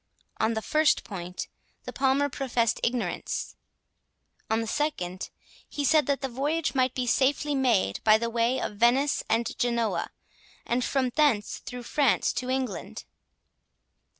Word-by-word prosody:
On 225 +1 +1
the 220 - -3
first 305 0 +2
point, 180 -3 -6 0.4
the - - -7
Palmer 270 +1 +2
professed 245 -4 0
ignorance; 240 0 -2 0.9
on 220 +1 +2
the 225 - -2
second, 200 -9 -2 0.4
he 290 - -2
said 310 0 +4
that 280 -1 0
the 270 - -1
voyage 285 +6 -1
might 255 -2 +1
be 255 - -1
safely 280 +4 +2
made 240 - +1
by 215 0 +6
the 235 +1 -2
way 235 +3 +1
of 210 - -4
Venice 255 +6 +3
and 225 +1 0
Genoa, 235 -2 0 0.6
and 245 +1 0
from 265 -1 0
thence 255 -8 +1
through 250 -1 -8
France 275 0 +2
to 255 - -3
England. 260 0 -3
250 Hz, 145 wpm, -27 LUFS, 230-280 Hz, 0.9 s, by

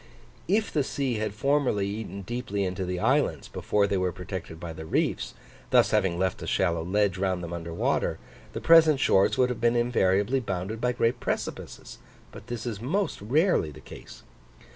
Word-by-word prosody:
If 215 +2 +1
the 150 - +2
sea 130 -3 -2
had 105 -1 -3
formerly 135 -6 +1
eaten 100 -1 -5
deeply 105 -2 -3
into 95 0 -2
the 90 0 -3
islands, - - +1
before 105 -1 0
they 100 -1 0
were 90 -1 0
protected 90 -2 -7
by 85 -1 -6
the 80 0 -8
reefs, 80 - -1 0.3
thus - - +4
having 90 -3 +2
left 95 -1 -1
a - - -6
shallow 85 -3 +1
ledge 95 +1 +1
round 95 -2 -1
them 85 0 -5
under 85 -1 -6
water, 85 - 0 0.4
the - - -5
present 160 -3 +6
shores 95 -6 +3
would 125 -1 +3
have 125 - -4
been 120 0 +3
invariably 120 0 +2
bounded 105 0 -4
by 125 - +2
great 120 0 +1
precipices, - - -5 0.3
but - - -12
this 120 -1 -5
is 110 -4 -4
most 185 - -1
rarely 145 - +2
the 75 0 -12
case. - - -12
100 Hz, 185 wpm, -27 LUFS, 90-125 Hz, 0.4 s, present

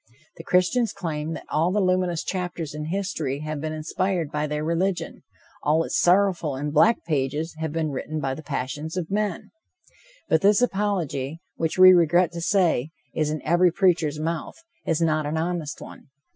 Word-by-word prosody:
The 165 - -9
Christians 185 +7 +2
claim 160 -4 -4
that 160 - -8
all 165 +4 +2
the 210 - +1
luminous 185 -3 +1
chapters 175 -5 -4
in 150 0 -5
history 160 -6 -2
have 155 -1 -4
been 155 0 -3
inspired 165 +1 -2
by 150 0 -1
their 150 0 -3
religion, 170 +3 -1 0.4
all 155 +2 +2
its - - -1
sorrowful 175 -5 +3
and 145 +2 -3
black 220 +10 +4
pages 150 +1 -1
have 160 -1 -2
been 160 -1 -1
written 155 +3 -4
by 135 -2 -1
the 155 - -7
passions 150 +3 -4
of 180 0 -3
men. 205 -3 -2 0.8
But 160 - +3
this 200 +1 +5
apology, 185 - -1 0.2
which, 160 +1 -2
we 185 0 +9
regret 175 0 +4
to 170 -1 -6
say, 170 - +2 0.2
is 155 -1 0
in 155 0 -4
every 175 +2 +4
preacher's 165 -5 +1
mouth, 165 +1 -3 0.3
is 165 0 +1
not 155 -2 +1
an 155 +2 -2
honest 165 -2 -3
one. - - -12
165 Hz, 175 wpm, -24 LUFS, 150-180 Hz, 0.8 s, we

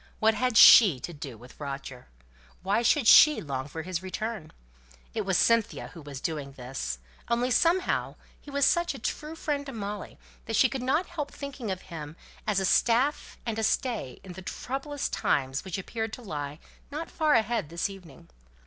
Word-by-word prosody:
What 220 0 +3
had 250 +1 0
she 195 - +9
to 175 - -6
do 145 -6 -8
with 125 +3 -15
Roger? 135 -3 -7 0.6
Why 200 +4 +2
should 260 +2 +3
she 305 +6 +8
long 135 -2 -4
for 160 +2 -6
his 180 0 -3
return? 190 -2 -5 0.6
It - - -3
was 190 -3 +2
Cynthia 230 -2 +2
who 165 - -12
was 140 -2 -8
doing 145 -2 -4
this; 130 - -5 0.3
only 240 +2 +1
somehow 345 +8 +2 0.2
he - - -14
was 280 -1 +2
such 345 0 +2
a - - -6
true 305 +1 -4
friend 295 -3 -2
to - - -5
Molly, 205 -2 -6 0.3
that 225 - -2
she 260 - +5
could 270 -2 -4
not 285 +8 +1
help 305 -5 -5
thinking 275 -5 -6
of 185 -1 -4
him 160 -4 -8 0.3
as 210 -2 +2
a 190 - 0
staff 245 +9 +2
and 225 -2 -2
a - - -1
stay 220 - -1
in 185 - -9
the 190 - -9
troublous 275 +8 -4
times 135 -1 0
which 190 -2 -4
appeared 220 +3 -4
to 250 - -8
lie 145 -6 -5 0.3
not 305 +3 -6
far 310 -2 +2
ahead 225 -7 +1
this 170 +3 -1
evening. 180 - -13
210 Hz, 185 wpm, -28 LUFS, 155-260 Hz, 0.6 s, she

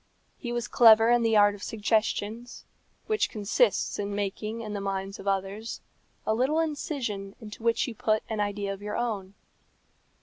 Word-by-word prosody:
He 240 - -5
was 240 -2 -2
clever 225 -1 +7
in 240 0 +4
the 225 -1 +3
art 205 0 +6
of 200 - -11
suggestion, 220 +1 -1 0.6
which 430 -1 +1
consists 215 - +1
in 200 0 -2
making 210 +3 -3
in 215 -2 -5
the 200 - -3
minds 195 0 -3
of 195 - -9
others 195 +3 -2 0.5
a 220 - +2
little 265 +8 +1
incision 265 -11 -3
into 210 0 -10
which 230 +2 +1
you 240 - -5
put 215 0 0
an 220 -1 -3
idea 205 -1 -1
of 195 - -10
your 210 0 -4
own. 205 -5 -3
215 Hz, 170 wpm, -28 LUFS, 200-235 Hz, 0.6 s, clever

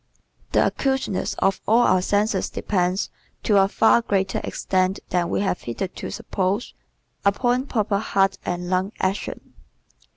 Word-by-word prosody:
The - - +4
acuteness 265 -8 -1
of 195 - +1
all 230 +3 +5
our 185 - +4
senses 205 +1 +1
depends, 185 -1 -1 0.3
to 210 - +3
a 195 - +4
far 225 +3 +4
greater 195 -4 0
extent 185 +1 0
than 175 -1 0
we - - 0
have 190 -3 -1
hitherto 180 +11 -5
supposed, 195 +4 -2 0.5
upon 245 +6 +1
proper 210 -5 0
heart 195 -2 +1
and 175 0 -3
lung 185 +3 0
action. 190 +2 -3
195 Hz, 135 wpm, -23 LUFS, 185-215 Hz, 0.5 s, all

